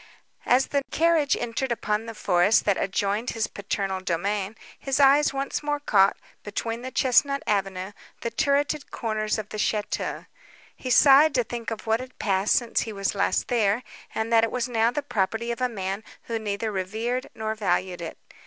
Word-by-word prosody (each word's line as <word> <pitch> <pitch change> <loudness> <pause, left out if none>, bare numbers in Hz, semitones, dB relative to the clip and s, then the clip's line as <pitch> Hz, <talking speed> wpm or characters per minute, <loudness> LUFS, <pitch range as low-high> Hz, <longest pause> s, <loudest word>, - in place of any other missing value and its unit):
As 255 +2 +3
the 280 - +1
carriage 320 -3 +2
entered 240 +2 -2
upon 215 -1 -1
the 225 - -7
forest 180 +2 +3
that 200 - +3
adjoined 200 +5 -1
his 225 -1 -1
paternal 195 -2 -3
domain, 195 +4 -2 0.2
his 270 0 -1
eyes 280 +1 +5
once 275 0 -2
more 295 0 -1
caught, 200 -8 +3 0.3
between 225 +3 -4
the 260 - -5
chesnut 275 +2 +2
avenue, 195 -2 -1 0.3
the 235 - -3
turreted 285 +4 0
corners 215 -1 -2
of 215 -1 -5
the 215 - -6
château. 210 0 -2 0.5
He 255 - -6
sighed 280 +3 +6
to 250 - +3
think 235 0 -5
of 225 - -6
what 225 0 +2
had 255 0 -10
passed 195 0 +2
since 240 -2 +1
he 225 - -4
was 195 -1 -1
last 200 - 0
there, 225 -1 +1 0.3
and 220 +1 -1
that 225 0 +6
it 225 - +2
was 250 +1 -2
now 230 -2 +2
the 285 +4 -3
property 225 -1 -1
of 235 - -5
a 250 - +2
man 195 -1 -4 0.2
who 230 -1 -3
neither 215 +1 -2
revered 220 +6 -2
nor 220 0 -2
valued 185 -4 -1
it. 165 - -6
225 Hz, 180 wpm, -25 LUFS, 200-255 Hz, 0.5 s, sighed